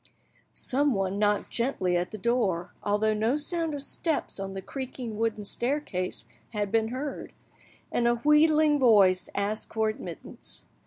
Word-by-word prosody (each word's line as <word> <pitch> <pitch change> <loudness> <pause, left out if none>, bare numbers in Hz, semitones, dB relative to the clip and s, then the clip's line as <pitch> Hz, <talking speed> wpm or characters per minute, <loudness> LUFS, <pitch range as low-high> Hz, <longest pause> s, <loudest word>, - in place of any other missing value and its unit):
Someone 210 -9 +1
knocked 210 -1 +1
gently 230 -8 0
at 175 +1 0
the 215 - -7
door, 195 -5 0
although 210 +1 +1
no 220 +5 +1
sound 320 +1 0
of 280 - -4
steps 315 - -1
on 195 0 -4
the 190 - -4
creaking 255 -3 -6
wooden 225 -2 -1
staircase 240 -5 -2 0.3
had 205 -2 -1
been 225 0 +2
heard, 265 +5 -5 0.6
and 235 - +1
a 240 - +3
wheedling 300 +3 +4
voice 200 -7 +5
asked 205 +2 -1
for 220 -1 +1
admittance. 215 - -6
225 Hz, 145 wpm, -27 LUFS, 205-275 Hz, 0.6 s, voice